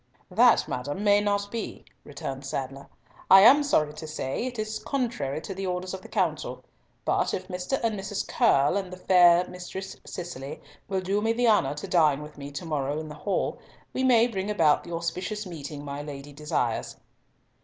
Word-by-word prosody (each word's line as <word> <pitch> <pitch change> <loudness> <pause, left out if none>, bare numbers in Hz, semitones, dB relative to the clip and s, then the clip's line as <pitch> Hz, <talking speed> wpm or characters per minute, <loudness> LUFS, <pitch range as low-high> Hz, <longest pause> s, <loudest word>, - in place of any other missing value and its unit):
"That, - - +5
madam, 145 +10 -3
may 205 0 +5
not 205 0 0
be," 230 -2 -5 0.2
returned 135 -2 -6
Sadler. 135 0 -5 0.4
"I 190 0 +10
am 275 +8 +8
sorry 155 - +2
to 160 - -8
say 155 - -3
it 245 -1 -6
is 215 0 -3
contrary 225 - -2
to 195 - -6
the 190 0 -4
orders 180 +1 -3
of 190 - -6
the - - -12
council, - - -2 0.4
but - - +1
if 185 0 -6
Mr. 180 +9 -2
and 220 -3 0
Mrs. 200 +1 -3
Curll, 175 - +3
and 190 -2 -4
the 185 - -7
fair 180 -1 +5
Mistress 190 +1 -7
Cicely, 145 -7 -7 0.3
will 190 -1 -1
do 195 +3 0
me 225 +1 +2
the 240 +1 +1
honour 150 -11 +3
to 150 - -6
dine 150 -4 +3
with 150 - -11
me 140 0 -8
to 140 +4 -7
morrow 145 -2 -1
in 155 -1 -6
the - - -7
hall, 195 +6 -2 0.3
we 260 - -1
may 240 -3 +5
bring 200 -4 -3
about 165 -8 +3
the 175 - -10
auspicious 185 +5 -3
meeting 145 -4 -7
my 140 0 -5
Lady 145 -1 -8
desires." 150 +1 -2
180 Hz, 190 wpm, -27 LUFS, 145-205 Hz, 0.4 s, I